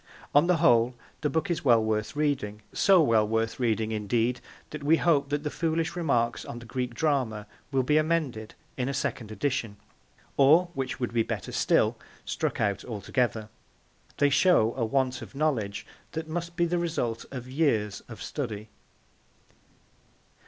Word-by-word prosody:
On 145 +4 +5
the 180 -1 +3
whole, 125 -6 +4 0.3
the 150 - +1
book 160 +4 -1
is 170 - -2
well 120 -5 +5
worth 110 +3 -1
reading; 135 -9 -1
so 190 -4 +5
well 110 -6 +3
worth 115 +2 -1
reading, 110 -2 0
indeed, 115 +3 0 0.3
that 150 - -6
we 155 +3 +4
hope 145 -5 +2
that 145 0 -1
the 150 - -2
foolish 165 0 -1
remarks 120 -9 0
on 120 - -7
the 120 - -10
Greek 125 0 -3
Drama 125 -8 0 0.3
will 135 -2 +2
be 150 +4 +3
amended 150 -9 -1 0.2
in 130 0 -1
a 140 - -2
second 115 -5 -3
edition, 115 -2 -2 0.6
or, 155 +6 +6
which 135 -3 -3
would 120 -2 -2
be 115 - +3
better - - -4
still, - - +2 0.3
struck - - -2
out 100 -1 0
altogether. 110 0 -2 0.7
They 145 0 +3
show 135 -9 +4
a 125 - -1
want 130 +1 0
of - - -10
knowledge 125 -10 -1 0.3
that 160 0 -4
must 170 +1 -4
be 170 -1 +2
the 175 +1 0
result 125 -9 -2
of 125 -2 -7
years 130 -8 0
of 115 - -8
study. 110 -7 -5
130 Hz, 165 wpm, -27 LUFS, 115-155 Hz, 0.7 s, or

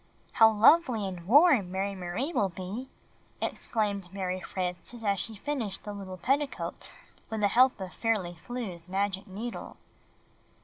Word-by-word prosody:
"How 225 -2 +7
lovely 225 0 +5
and 180 -3 -6
warm 270 - +6
Mary 195 +1 -1
Marie 195 - -3
will 200 -9 +2
be!" 190 +8 -6 0.5
exclaimed 200 -5 -2
Mar}^ 185 -1 -3
Frances 180 +5 -5
as 200 -2 +1
she 225 - -4
finished 225 -5 -3
the 205 - -5
little 190 -2 -7
petticoat 275 - -2 0.4
with 220 -1 -3
the 205 - +5
help 255 +2 +4
of 190 -1 -6
Fairly 210 -7 0
Flew's 185 -4 -6
magic 195 0 -1
needle. 215 +5 -6
200 Hz, 140 wpm, -29 LUFS, 185-235 Hz, 0.5 s, How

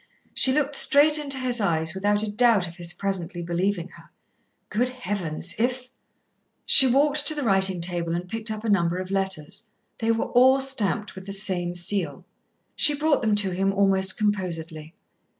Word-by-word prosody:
She 260 - +5
looked 290 0 -1
straight 300 +2 +4
into 280 -2 -3
his 250 -3 -1
eyes 160 -4 -1
without 205 +2 -1
a 215 - -4
doubt 220 -4 +2
of 170 +1 -12
his 175 -1 0
presently 180 -3 -4
believing 175 +1 -3
her. - - -18 0.6
Good 240 +4 -1
heavens! 185 -9 -4
if 250 +2 -3 0.7
She 265 - +8
walked 285 +3 +1
to 310 - +3
the 295 - -4
writing 190 -4 +2
table 170 -1 -1
and 175 +1 -6
picked 225 +3 -2
up 215 0 -6
a 225 - -3
number 175 -3 0
of 185 +1 -7
letters. 195 +2 -3 0.3
They 225 -1 0
were 225 - -1
all 260 +2 +4
stamped 225 -5 -1
with 190 0 -12
the 195 - -5
same 185 -3 0
seal. 175 -2 -2 0.5
She 295 - +3
brought 300 0 0
them 215 -3 0
to 200 -2 +1
him 195 +2 -1
almost 195 -1 +3
composedly. 170 -6 -4
200 Hz, 175 wpm, -23 LUFS, 180-245 Hz, 0.7 s, She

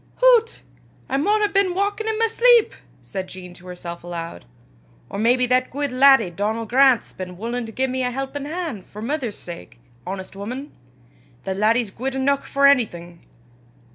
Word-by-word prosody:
"Hoots! 485 -2 +4 0.5
I 270 - 0
maun 415 +9 +2
hae 420 - +4
been 390 -3 +2
walkin' 410 +3 -1
i' 440 - 0
my 455 - +3
sleep!" 470 0 +4 0.3
said 190 -1 -5
Jean 180 -1 -10
to 180 +1 -14
herself 175 -1 -8
aloud. 170 - -7 0.7
"Or - - -4
maybe 245 +3 +3
that 255 +1 +2
guid 285 0 -2
laddie 255 -6 +5
Donal 215 +5 -2
Grant's 260 +1 +3
been 180 -1 -7
wullin' 235 +3 -3
to - - -8
gie 260 +4 0
me 260 0 -2
a 250 - 0
helpin' 270 +2 -4
han' 315 - -4
for 205 - -13
's 215 - -5
mither's 255 -6 -3
sake, 170 -7 -10 0.3
honest 190 0 -6
wuman! 250 +9 -6 0.7
The 190 - -2
laddie's 215 +2 +1
guid 265 +5 -4
eneuch 275 +1 +1
for 280 0 +2
onything! 175 -11 +1
250 Hz, 175 wpm, -22 LUFS, 195-285 Hz, 0.7 s, laddie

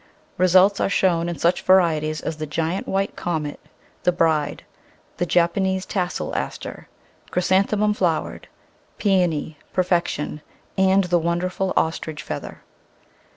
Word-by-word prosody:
Results 185 +2 +5
are - - +1
shown 175 -3 +2
in 170 - -4
such 170 +5 +2
varieties 155 -5 +3
as 155 - -4
the 155 0 -4
Giant 165 +5 -2
White 195 +1 -1
Comet, 155 -4 -3 0.4
the 180 - +3
Bride, 160 -4 0 0.5
the 175 - -1
Japanese 185 +3 +1
Tassel 180 -3 -2
Aster, - - -5 0.4
Chrysanthemum 200 +3 +2
Flowered, 175 -6 -1 0.5
Peony, 170 -7 +1
Perfection, 170 -5 0 0.3
and 190 0 +4
the 175 -1 +2
wonderful 180 +3 -1
Ostrich 160 -1 -1
Feather. - - -7
175 Hz, 115 wpm, -22 LUFS, 160-190 Hz, 0.5 s, Results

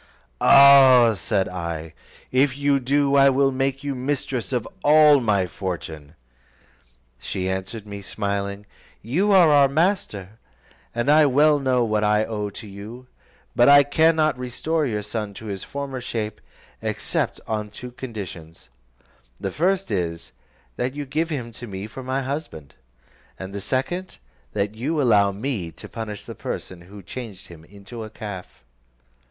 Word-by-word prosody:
"Ah!" 135 -4 +8
said 100 -1 -1
I, 85 -3 -5 0.4
"if 135 +1 +2
you 140 -1 +2
do, 140 +2 +1
I 140 0 +6
will 135 +1 +2
make 135 +1 -2
you 140 -1 -2
mistress 130 -4 -3
of 120 -3 -1 0.2
all 150 -1 +6
my 105 -6 +1
fortune." 80 -4 -6 1.0
She 95 +7 -4
answered 95 +3 -4
me, 100 -1 -8
smiling, 100 0 -3 0.4
"You 180 - +1
are 180 -5 +6
our 140 -1 +6
master, 135 - -1 0.6
and 120 +4 +1
I 155 0 +6
well 145 +2 +4
know 130 -3 +1
what 110 -2 0
I 105 +1 +2
owe 105 -2 -3
to 100 - -10
you; 105 +5 -10 0.5
but 120 +3 +5
I 145 0 +8
cannot 155 -1 +2
restore 150 +5 -1
your 105 -3 -3
son 105 -1 -5
to 110 - -10
his 100 -3 -5
former 140 -2 -5
shape, 110 -3 -4 0.4
except - - -2
on 105 -1 -3
two 125 +4 -9
conditions: 90 - -9 0.7
the 95 - -3
first 185 - 0
is, 85 -4 -3 0.5
that 130 +2 -2
you 145 0 -4
give 155 +5 -1
him 125 -7 -4
to 120 +1 -9
me 95 -1 -6
for 115 +4 -9
my 130 +1 -2
husband; 130 - -6 0.6
and 95 +1 -8
the 100 - -5
second, 135 - -3 0.4
that 100 +1 -1
you 140 +8 -2
allow 105 -7 +4
me 100 -5 -4
to - - -11
punish 110 -3 -7
the - - -7
person 90 -2 -6
who 100 +3 -13
changed 100 -1 -8
him 85 -2 -13
into 100 +5 -10
a 110 - -8
calf." 105 - -9
115 Hz, 155 wpm, -23 LUFS, 100-140 Hz, 1.0 s, Ah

